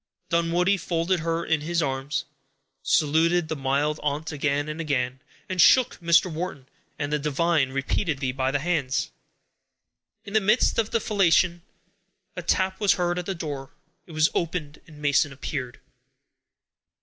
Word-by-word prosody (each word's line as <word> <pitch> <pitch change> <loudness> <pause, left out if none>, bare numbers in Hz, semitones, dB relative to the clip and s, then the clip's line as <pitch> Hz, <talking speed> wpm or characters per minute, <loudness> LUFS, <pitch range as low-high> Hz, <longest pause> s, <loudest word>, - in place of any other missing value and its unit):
Dunwoodie 170 +3 +2
folded 175 +1 -1
her 165 +1 -2
in 160 -2 +1
his 170 +3 -1
arms, 135 -1 -2 0.6
saluted 160 +4 +2
the 160 - -1
mild 140 +2 0
aunt 150 +2 -2
again 145 0 -1
and 155 +2 -4
again, 130 -4 -1 0.3
and 185 -2 +1
shook 255 +6 +5
Mr. 170 0 +4
Wharton 155 -5 -5 0.3
and 145 0 -3
the 150 - +1
divine 150 0 +1
repeatedly 135 0 -1
by 130 0 -1
the 140 - +1
hands. 145 -4 -1 1.1
In 200 - -9
the 220 - +4
midst 215 +4 +3
of 220 -1 0
the 230 - +1
felicitation, 185 -4 +2 0.7
a - - -4
tap 190 0 0
was 205 -3 +4
heard 175 0 -1
at 180 - -6
the 195 - -2
door. 145 -5 -6 0.3
It 170 - -12
was 155 +1 +3
opened, 160 -3 -3
and 155 -2 -14
Mason 145 0 +3
appeared. 130 -2 -5
160 Hz, 150 wpm, -25 LUFS, 145-175 Hz, 1.1 s, shook